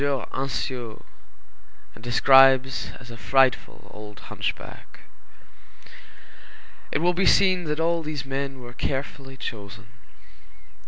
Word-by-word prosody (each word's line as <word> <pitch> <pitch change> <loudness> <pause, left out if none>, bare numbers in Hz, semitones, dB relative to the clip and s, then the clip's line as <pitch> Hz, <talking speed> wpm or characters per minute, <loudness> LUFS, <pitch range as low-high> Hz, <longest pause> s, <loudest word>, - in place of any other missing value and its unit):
Anciot_, 130 -3 -3 0.9
and 110 - -15
describes 130 +1 +5
as 120 -2 -12
a 115 - -9
frightful 130 +4 +1
old 105 -1 -11
hunchback. - - -6 1.9
It - - 0
will 175 +3 +2
be 185 +2 +1
seen 185 -3 +4
that 150 0 -2
all 165 +1 +1
these 150 -4 -5
men 135 -1 -4
were 120 0 -10
carefully 135 +1 -5
chosen. 110 -2 -8
135 Hz, 105 wpm, -24 LUFS, 120-145 Hz, 1.9 s, describes